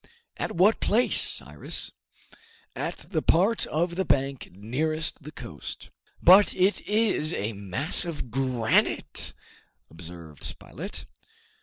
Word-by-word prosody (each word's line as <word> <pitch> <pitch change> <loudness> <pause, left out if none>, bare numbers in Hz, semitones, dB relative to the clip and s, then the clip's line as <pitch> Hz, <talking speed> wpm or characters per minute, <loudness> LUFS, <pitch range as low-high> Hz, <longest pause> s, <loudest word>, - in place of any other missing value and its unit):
"At - - -3
what 195 +6 +4
place, 235 +4 +3
Cyrus?" - - -2 0.8
"At - - -3 0.2
the 160 -5 +1
part 195 +10 +2
of 170 +3 -1
the 190 +2 0
bank 135 -5 0
nearest 150 - -2
the 150 +2 -9
coast." 75 - -9 0.3
"But 190 +3 +7
it 190 +3 +2
is 210 -7 +1
a 105 +3 -2
mass 100 - +2
of 155 -8 -5
granite!" 125 -3 0 0.6
observed 80 -2 -11
Spilett. - - -7
155 Hz, 115 wpm, -26 LUFS, 110-180 Hz, 0.8 s, But